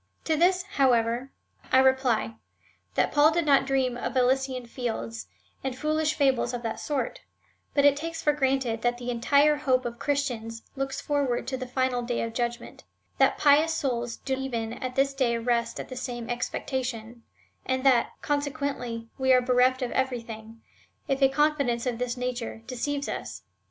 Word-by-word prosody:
To 320 - +1
this, 360 +3 +3
however, 250 - +1 0.4
I - - +6
reply, 260 -4 +2 0.6
that - - +2
Paul 295 +1 +6
did 335 0 0
not 275 -2 +4
dream 265 -2 +1
of 245 +2 -3
Elysian 255 0 +1
fields,^ 230 -1 -4 0.4
and 265 -1 -3
foolish 310 +1 0
fables 260 -4 +2
of 240 - -6
that 225 -1 -3
sort, 275 -5 -3 0.5
but 280 - +4
takes 330 +3 -5
it - - -7
for 295 - +4
granted, 265 -5 0
that 240 0 +1
the 245 0 -4
entire 285 +5 +3
hope 255 -3 +1
of 235 0 -5
Christians 240 -6 -2
looks 270 0 -3
forward 280 -4 0
to 265 - -3
the 255 -1 -5
final 255 -1 0
day 240 0 -2
of 230 -1 -4
judgment 240 0 -4 0.2
— - - -42
that - - +4
pious 305 +2 +4
souls 240 -4 -2
do 265 -1 -2
even 235 -4 -3
at 255 +1 -5
this 275 0 +2
day 250 -4 +1
rest 235 0 0
in - - -4
the 255 - -9
same 245 -2 -5
expectation, 240 -2 -3 0.5
and 260 0 0
that, 255 -4 +5 0.2
consequently, 280 -5 -2
^YQ 260 -1 +5
are 250 - +4
bereft 255 +1 +3
of 245 - -2
everything, 230 -3 -3 0.5
if 270 -1 0
a 270 - +6
confidence 280 -4 +1
of 245 -2 -2
this 250 0 -2
nature 245 -2 -4
deceives 280 +3 -3
us. - - -5
255 Hz, 170 wpm, -27 LUFS, 240-275 Hz, 0.6 s, I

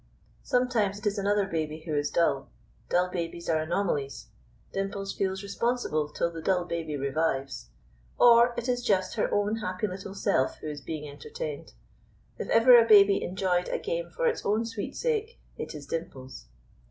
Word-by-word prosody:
Sometimes 240 -6 +1
it 210 - -11
is 205 0 0
another 200 0 +2
baby 155 -3 -3
who 155 -1 -4
is 145 0 0
dull. 140 -5 +1 0.4
Dull 180 +1 +2
babies 170 -1 -4
are 160 -1 +2
anomalies. 155 -5 -2 0.4
Dimples 195 0 -3
feels 190 0 -2
responsible 200 -7 -1
till 170 +3 -1
the 165 -1 -7
dull 180 0 +1
baby 165 -3 -3
revives. 135 - -2 0.5
Or 235 0 +6
it 240 +1 -3
is 245 -1 0
just 195 -6 +1
her 220 - -1
own 205 +2 +1
happy 185 -2 -3
little 195 0 -6
self 130 -8 +1
who 155 - -6
is 145 -1 -8
being 150 0 -5
entertained. 460 - -7 0.7
If - - -4
ever 240 +1 +8
a - - -4
baby 200 -2 +7
enjoyed 180 -1 0
a - - -1
game - - -3
for - - -3
its 470 -1 +1
own 215 +3 +1
sweet 225 -3 -5
sake, 460 -1 -2 0.2
it - - -6
is 145 -1 -8
Dimples. 140 - -6
190 Hz, 170 wpm, -28 LUFS, 160-225 Hz, 0.7 s, ever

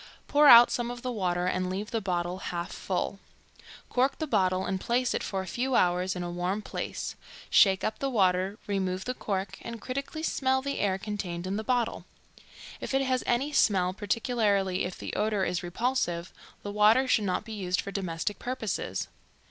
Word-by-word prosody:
Pour 295 0 +5
out 240 -2 +10
some 240 -1 -1
of 245 0 -7
the 255 - -2
water 180 -5 -1
and 185 0 0
leave 200 +4 -4
the 225 - -1
bottle 180 -1 -2
half 175 -2 -4
full; 195 +1 -3 0.7
cork 260 +2 +1
the 315 - -2
bottle 185 -9 +1
and 190 0 -2
place 245 +1 +1
it - - -1
for 190 -1 -3
a - - -8
few 250 +7 -1
hours 180 0 +2
in 180 - -3
a 175 - -4
warm 180 +3 -1
place; - - -4 0.4
shake 190 -2 +5
up 215 - -2
the 275 - -1
water, 190 -3 +2
remove 190 -2 -2
the 255 - -1
cork, 195 -4 -3
and 235 -1 -7
critically 275 +7 -5
smell 265 -4 +1
the 280 +1 -3
air 190 -2 +1
contained 190 -4 -4
in 190 +1 -2
the 215 - -2
bottle. 245 0 0 0.7
If - - -3
it 270 - +3
has 255 -1 0
any 265 +5 +1
smell, 185 -8 +3
particularly 205 -3 0
if 180 - -5
the - - -6
odor 210 -2 +1
is 180 - -1
repulsive, 175 -2 -1 0.3
the 205 - -4
water 215 +5 +4
should 220 -4 +2
not 185 +2 -1
be 220 - -7
used 185 -3 -1
for 200 - -3
domestic 190 +1 -3
purposes. 245 -5 -3
200 Hz, 190 wpm, -28 LUFS, 185-240 Hz, 0.7 s, out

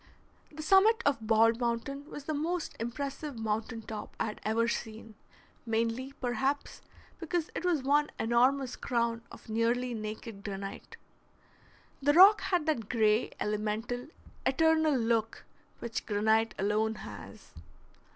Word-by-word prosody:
The 310 +1 -7
summit 425 +7 +5
of 230 -6 +1
Bald 225 +1 +4
Mountain 250 +5 -3
was 290 - -8
the 310 - -3
most 330 +3 -2
impressive 275 +3 -4
mountain 225 +1 -3
top 215 -1 -7
I - - +1
had 215 - -6
ever 225 +2 +1
seen, 225 -1 -5 0.5
mainly, 230 +4 -1
perhaps, 270 +2 -2 0.4
because 335 -1 -2
it - - -4
was 340 -7 +1
one 290 +2 +3
enormous 250 +3 +2
crown 235 -1 -1
of - - -13
nearly 235 +3 0
naked 215 -1 -6
granite. 195 -1 -7 1.0
The 290 +2 +3
rock 390 +6 +8
had 360 -4 0
that 240 -10 -1
gray, 220 -1 +2
elemental, 215 +4 -2 0.4
eternal 315 0 +3
look 225 -1 0 0.3
which 235 -1 -5
granite 220 +2 +2
alone 215 +3 +1
has. - - -10
235 Hz, 130 wpm, -30 LUFS, 220-290 Hz, 1.0 s, rock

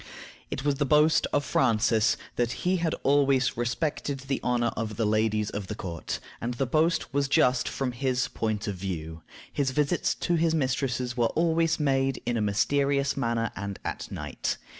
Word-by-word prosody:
It 135 - -4
was 145 -2 +1
the - - +4
boast 150 +3 +4
of 145 - +1
Francis 115 -2 +2 0.2
that 120 0 0
he 185 +1 +3
had 165 -2 0
always 140 -2 +3
respected 135 +3 -2
the 135 0 -2
honor 120 -1 +1
of 110 -2 -3
the 115 - +1
ladies 110 0 +1
of 100 -2 -5
the 105 - -4
court, 85 -6 -5 0.2
and 120 +1 -2
the 135 - 0
boast 155 +4 +1
was 140 0 +1
just, 125 -2 +3
from 135 -2 -2
his 125 0 0
point 110 -1 -2
of 100 - -1
view. 85 -3 -5 0.3
His 140 -2 +1
visits 150 +5 +1
to 175 - -1
his 165 0 +2
mistresses 130 -3 -1
were 120 -2 +2
always 165 0 +2
made 135 -2 +1
in 120 - 0
a 115 - 0
mysterious 140 +7 +1
manner, 115 -4 -1
and 100 0 -5
at - - -4
night. - - -3
125 Hz, 180 wpm, -27 LUFS, 110-140 Hz, 0.3 s, the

